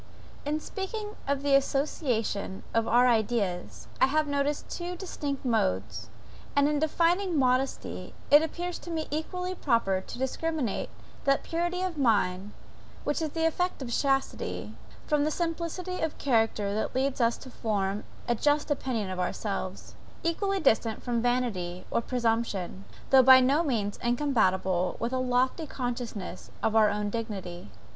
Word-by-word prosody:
In 300 +1 0
speaking 415 +5 -5
of 280 0 0
the 285 -1 +2
association 260 - 0
of 230 0 +2
our 245 +2 +5
ideas, 215 -6 0 0.2
I 260 - +7
have 305 +3 +2
noticed 285 0 -1
two 355 0 -4
distinct 290 -7 -4
modes; 110 - 0 0.5
and 285 0 +5
in 295 -1 +1
defining 340 +3 +2
modesty, 260 0 0 0.2
it 295 +1 +9
appears 350 +2 -3
to - - -10
me 320 -2 -2
equally 360 +4 -2
proper 230 - +1
to 190 - -9
discriminate 265 -1 -2 0.4
that 275 0 +3
purity 345 +2 -1
of 355 -5 -3
mind, 205 -5 +2 0.5
which 295 - -1
is 315 - 0
the 325 +2 -1
effect 355 -2 0
of 240 - -5
chastity, 270 0 -1 0.3
from 300 -2 +2
a 305 - +2
simplicity 340 +2 -3
of 320 - -1
character 225 -5 +1
that 215 +3 -2
leads 265 0 0
us 230 0 +3
to 260 - -11
form 205 -3 -1 0.2
a 240 - +3
just 290 +5 +1
opinion 235 -8 -1
of 185 - -4
ourselves, 190 0 -3 0.3
equally 390 +4 0
distant 225 -6 +2
from 240 -2 0
vanity 220 -8 -1
or - - +2
presumption, 225 -6 -1 0.3
though 265 -1 +9
by 260 0 +9
no 270 +5 +3
means 225 -10 -1
incompatible 190 -8 +1
with 235 +2 -2
a 260 - +1
lofty 255 +5 +1
consciousness 240 -8 -5
of 220 - +1
our 215 -1 +6
own 205 0 -1
dignity. 195 - -5
255 Hz, 150 wpm, -28 LUFS, 215-305 Hz, 0.5 s, it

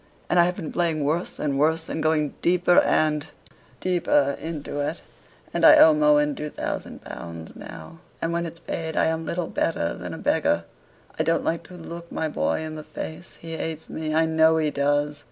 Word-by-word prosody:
And 175 - +4
I 170 - +7
have 180 +1 -1
been 165 -6 -6
playing 165 -4 0
worse 160 +5 -1
and 140 -2 -1
worse, 160 +2 +2
and 160 - -3
going 155 -2 +1
deeper 175 0 +4
and 150 -1 +2 0.5
deeper 150 -6 +2
into 155 -3 -5
it; 145 - -3 0.5
and - - -1
I - - +9
owe 160 - +8
Mohun 150 -1 +4
two 150 +2 -5
thousand - - -5
pounds 85 -1 -8
now; 80 - -10 0.2
and 165 +1 -1
when 170 0 -1
it's 165 +1 -10
paid 160 -1 -4
I - - +4
am 160 0 -1
little 175 0 -1
better 85 - -1
than - - -6
a - - -8
beggar. - - +1 0.6
I - - +4
don't 165 - +1
like 165 - 0
to 180 - -12
look 170 0 -9
my 160 - -1
boy 155 - -1
in 155 0 -5
the 155 0 -7
face; 155 +2 -8
he 165 0 -6
hates 160 0 -5
me, 155 -1 -3
I 160 +1 +4
know 160 0 +4
he 155 -2 +1
does. 145 +1 0
160 Hz, 200 wpm, -24 LUFS, 150-165 Hz, 0.6 s, I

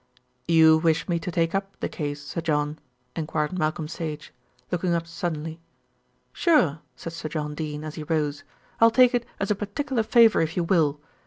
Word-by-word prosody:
"You 160 -1 +6
wish 160 -1 +1
me 170 -1 0
to 180 - -5
take 165 0 0
up 195 0 -3
the - - -1
case, 145 -2 -5
Sir 170 - -4
John?" 150 -1 -1 0.4
enquired 155 +2 -2
Malcolm 155 0 -1
Sage, 155 -2 -6 0.4
looking 175 -1 0
up 165 0 -1
suddenly. 165 -1 -4 0.7
"Sure," 185 - +3 0.2
said 165 - -7
Sir 160 -1 -5
John 150 -1 -3
Dene 150 -1 -5
as 155 -1 -6
he 155 - -6
rose. 150 -2 -1 0.4
"I'll 230 - +7
take 250 +1 +5
it 240 -1 0
as 200 - -1
a - - +3
particular 225 +6 -2
favour 225 0 +5
if 165 +1 -2
you 175 - +2
will. 160 -5 +2
165 Hz, 180 wpm, -25 LUFS, 155-185 Hz, 0.7 s, I'll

